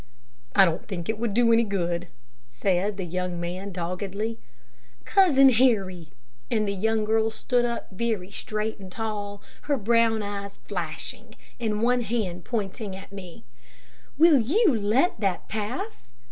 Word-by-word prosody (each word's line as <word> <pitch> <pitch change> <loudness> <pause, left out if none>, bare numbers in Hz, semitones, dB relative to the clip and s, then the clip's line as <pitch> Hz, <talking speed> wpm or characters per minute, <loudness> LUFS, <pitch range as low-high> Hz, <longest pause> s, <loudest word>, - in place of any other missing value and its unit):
"I 195 - +8
don't 170 0 -2
think 175 -5 -5
it 220 -1 -1
would 225 -3 -1
do 235 -1 +5
any 230 +1 +5
good," 175 -4 -2 0.4
said 185 - 0
the 190 - -3
young 180 0 -3
man, 180 +3 -4
doggedly, 195 +5 -3 0.7
"Cousin 295 -9 +6
Harry!" 200 -9 +2 0.4
and 215 -2 +1
the 200 - 0
young 220 +2 +1
girl 220 +1 +2
stood 240 +2 0
up 235 -1 -3
very 200 -2 -2
straight 215 +2 -3
and 190 -2 -10
tall, 205 -1 -4 0.3
her 285 - +3
brown 225 0 +3
eyes 200 -1 -5
flashing, 170 -6 -5 0.2
and 215 -2 -1
one 245 +1 +3
hand 200 -6 -2
pointing 205 -3 -3
at 190 +1 -11
me; 185 -4 -10 0.7
"will 315 -2 +7
you 320 - +3
let 220 - +2
that 195 -4 -1
pass? 220 - -4
210 Hz, 145 wpm, -26 LUFS, 185-230 Hz, 0.7 s, I